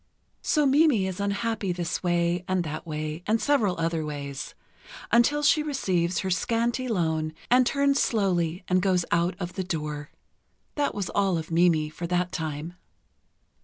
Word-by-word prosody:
So 300 Hz, -2 st, +2 dB
Mimi 275 Hz, -7 st, +4 dB
is 190 Hz, 0 st, -4 dB
unhappy 200 Hz, 0 st, -1 dB
this 175 Hz, -1 st, -3 dB
way 175 Hz, 0 st, +1 dB
and 185 Hz, -1 st, +1 dB
that 155 Hz, +1 st, -6 dB
way 155 Hz, +1 st, -4 dB
and 220 Hz, +2 st, +2 dB
several 220 Hz, -12 st, +1 dB
other 165 Hz, -1 st, 0 dB
ways, 140 Hz, -2 st, -6 dB, 0.6 s
until 290 Hz, +6 st, +3 dB
she 305 Hz, +1 st, +4 dB
receives 185 Hz, -, 0 dB
her 190 Hz, -1 st, -2 dB
scanty 235 Hz, +6 st, 0 dB
loan 160 Hz, -7 st, 0 dB, 0.2 s
and 250 Hz, 0 st, +5 dB
turns 280 Hz, 0 st, +2 dB
slowly 180 Hz, -5 st, 0 dB
and 185 Hz, 0 st, +2 dB
goes 185 Hz, -2 st, +2 dB
out 170 Hz, +1 st, +2 dB
of 175 Hz, -1 st, -4 dB
the 190 Hz, -, -3 dB
door. 150 Hz, -4 st, -4 dB, 0.6 s
That 290 Hz, -1 st, -1 dB
was 200 Hz, -3 st, -3 dB
all 195 Hz, -3 st, +1 dB
of 160 Hz, 0 st, -6 dB
Mimi, 165 Hz, -2 st, +3 dB
for 170 Hz, +2 st, -5 dB
that 180 Hz, +1 st, 0 dB
time. 160 Hz, 0 st, -4 dB
180 Hz, 160 wpm, -26 LUFS, 165-225 Hz, 0.6 s, and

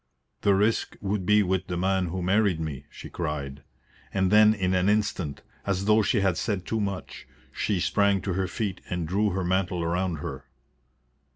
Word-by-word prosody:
"The 100 Hz, -1 st, +4 dB
risk 105 Hz, +3 st, +1 dB
would 100 Hz, -2 st, -2 dB
be 105 Hz, 0 st, +5 dB
with 95 Hz, -2 st, -1 dB
the 90 Hz, -1 st, -3 dB
man 95 Hz, 0 st, +1 dB
who 90 Hz, +2 st, -3 dB
married 95 Hz, -2 st, +2 dB
me," 75 Hz, -4 st, -5 dB
she -, -, -10 dB
cried. 75 Hz, -4 st, -4 dB, 0.5 s
And 95 Hz, -1 st, +1 dB
then 105 Hz, 0 st, +6 dB
in 95 Hz, -2 st, 0 dB
an 90 Hz, +1 st, +2 dB
instant, 100 Hz, -8 st, -1 dB, 0.2 s
as 100 Hz, -1 st, -1 dB
though 110 Hz, +1 st, +5 dB
she 105 Hz, +1 st, +1 dB
had 95 Hz, -4 st, +1 dB
said 100 Hz, -4 st, -2 dB
too 110 Hz, -, -1 dB
much, 100 Hz, -2 st, -5 dB, 0.2 s
she 100 Hz, -4 st, -1 dB
sprang 100 Hz, +2 st, +2 dB
to 95 Hz, -, -2 dB
her 95 Hz, +1 st, 0 dB
feet 100 Hz, -3 st, -3 dB
and 90 Hz, -3 st, -2 dB
drew 105 Hz, +5 st, +1 dB
her 95 Hz, 0 st, -2 dB
mantle 90 Hz, -1 st, 0 dB
round 90 Hz, 0 st, -1 dB
her. 70 Hz, -1 st, -6 dB
95 Hz, 185 wpm, -26 LUFS, 90-100 Hz, 0.5 s, then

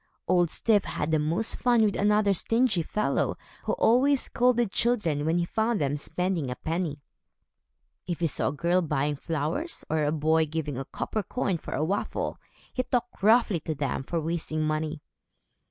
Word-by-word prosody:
Old 175 Hz, -2 st, +3 dB
Styf 210 Hz, +1 st, +2 dB
had 150 Hz, -, -3 dB
the 155 Hz, -, +3 dB
most 165 Hz, +9 st, +2 dB
fun 240 Hz, -3 st, +3 dB
with 205 Hz, -, 0 dB
another 210 Hz, 0 st, +3 dB
stingy 225 Hz, 0 st, +1 dB
fellow, 210 Hz, +6 st, -1 dB, 0.3 s
who -, -, 0 dB
always 265 Hz, +4 st, +4 dB
scolded 240 Hz, -3 st, +2 dB
children 195 Hz, -13 st, 0 dB
when 165 Hz, +2 st, +2 dB
he 175 Hz, -, +1 dB
found 220 Hz, +3 st, 0 dB
them 140 Hz, 0 st, 0 dB
spending 165 Hz, 0 st, -2 dB
a 125 Hz, -, -3 dB
penny. 160 Hz, -3 st, -3 dB, 1.0 s
If 175 Hz, -2 st, -3 dB
he 170 Hz, -, +1 dB
saw 155 Hz, -, 0 dB
a -, -, +1 dB
girl 170 Hz, +5 st, +1 dB
buying 150 Hz, -2 st, 0 dB
flowers, 160 Hz, -, -3 dB
or 155 Hz, -1 st, +1 dB
a 145 Hz, -, +1 dB
boy 160 Hz, +1 st, +2 dB
giving 150 Hz, -2 st, -3 dB
a 135 Hz, +2 st, -4 dB
copper 215 Hz, -, -3 dB
coin 195 Hz, -3 st, -2 dB
for -, -, -6 dB
a 155 Hz, -, 0 dB
waffle, 195 Hz, +5 st, -2 dB, 0.3 s
he 255 Hz, -, 0 dB
talked 245 Hz, -3 st, -2 dB
roughly 220 Hz, -3 st, +4 dB
to 155 Hz, 0 st, -4 dB
them 140 Hz, -2 st, -2 dB
for 165 Hz, +5 st, -2 dB
wasting 160 Hz, -1 st, -2 dB
money. 155 Hz, 0 st, -2 dB
170 Hz, 175 wpm, -27 LUFS, 155-215 Hz, 1.0 s, always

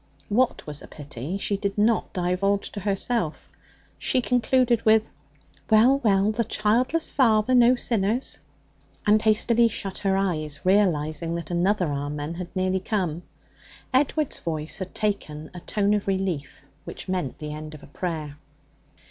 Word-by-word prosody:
What 245 Hz, +4 st, +1 dB
was 150 Hz, -1 st, -4 dB
a -, -, -11 dB
pity 145 Hz, +4 st, -6 dB
she 200 Hz, 0 st, -1 dB
did 200 Hz, 0 st, -3 dB
not 220 Hz, +2 st, +2 dB
divulge 185 Hz, +3 st, 0 dB
to 205 Hz, -, -6 dB
herself. 200 Hz, -2 st, -1 dB, 0.5 s
She -, -, +1 dB
concluded 245 Hz, -1 st, +2 dB
with, 220 Hz, 0 st, +5 dB, 0.7 s
'Well, 240 Hz, +5 st, +5 dB
well, 205 Hz, -4 st, +3 dB
the 230 Hz, +2 st, 0 dB
childless 235 Hz, +9 st, +1 dB
father 230 Hz, -2 st, +3 dB
no 245 Hz, 0 st, +6 dB
sinners,' 230 Hz, 0 st, 0 dB, 0.7 s
and 210 Hz, 0 st, +4 dB
hastily 225 Hz, +2 st, +3 dB
shut 195 Hz, -3 st, -4 dB
her 195 Hz, -1 st, +1 dB
eyes, 155 Hz, -7 st, -1 dB
realizing 170 Hz, -4 st, +1 dB
that 170 Hz, -1 st, -5 dB
another 180 Hz, -1 st, +1 dB
'Amen' 145 Hz, +2 st, -4 dB
had 175 Hz, +1 st, -6 dB
nearly 185 Hz, 0 st, +1 dB
come. 180 Hz, -5 st, -2 dB, 0.7 s
Edward's 290 Hz, +2 st, +1 dB
voice 155 Hz, -2 st, -3 dB
had 190 Hz, -1 st, -6 dB
taken 155 Hz, -8 st, -3 dB
a 180 Hz, -, -7 dB
tone 200 Hz, +3 st, 0 dB
of 205 Hz, -1 st, -1 dB
relief 190 Hz, -8 st, -2 dB, 0.2 s
which -, -, -8 dB
meant 180 Hz, -8 st, -2 dB
the 150 Hz, -1 st, -6 dB
end 155 Hz, 0 st, -7 dB
of 150 Hz, -, -13 dB
a -, -, -10 dB
prayer. 155 Hz, -2 st, -5 dB
195 Hz, 150 wpm, -25 LUFS, 165-220 Hz, 0.7 s, no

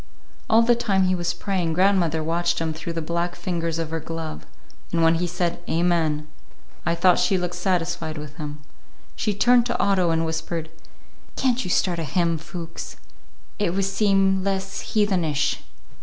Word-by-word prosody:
All 225 Hz, +1 st, +6 dB
the 240 Hz, +1 st, +5 dB
time 205 Hz, -5 st, +1 dB
he 185 Hz, 0 st, +2 dB
was 175 Hz, -1 st, 0 dB
praying, 185 Hz, -5 st, -1 dB
grandmother 175 Hz, -3 st, +2 dB
watched 170 Hz, +2 st, 0 dB
him 160 Hz, -1 st, -1 dB
through 165 Hz, +2 st, -5 dB
the 165 Hz, -1 st, -3 dB
black 170 Hz, +2 st, -1 dB
fingers 170 Hz, -2 st, -2 dB
of 165 Hz, -1 st, -3 dB
her 165 Hz, -, -1 dB
glove, 160 Hz, -, -6 dB, 0.4 s
and 165 Hz, -1 st, +2 dB
when 165 Hz, 0 st, +5 dB
he 175 Hz, +2 st, 0 dB
said 175 Hz, 0 st, -2 dB
"Amen," 160 Hz, -3 st, +1 dB, 0.6 s
I 170 Hz, -, +2 dB
thought 180 Hz, +1 st, +4 dB
she 185 Hz, +2 st, +3 dB
looked 180 Hz, -1 st, -2 dB
satisfied 175 Hz, -4 st, -1 dB
with 150 Hz, 0 st, -8 dB
him. 150 Hz, -1 st, -6 dB, 0.5 s
She 210 Hz, -, -1 dB
turned 240 Hz, +3 st, +4 dB
to 240 Hz, -, -1 dB
Otto 185 Hz, -3 st, +3 dB
and 165 Hz, 0 st, +1 dB
whispered, 160 Hz, 0 st, -3 dB, 0.6 s
"Can't 255 Hz, -1 st, +1 dB
you -, -, -4 dB
start 175 Hz, -1 st, +1 dB
a -, -, -2 dB
hymn, 165 Hz, +2 st, 0 dB
Fuchs? 165 Hz, +1 st, -7 dB, 0.6 s
It 190 Hz, -4 st, 0 dB
would 195 Hz, 0 st, +1 dB
seem 195 Hz, -1 st, +2 dB
less 195 Hz, 0 st, -2 dB, 0.2 s
heathenish." 165 Hz, -8 st, +1 dB
170 Hz, 170 wpm, -24 LUFS, 165-190 Hz, 0.6 s, All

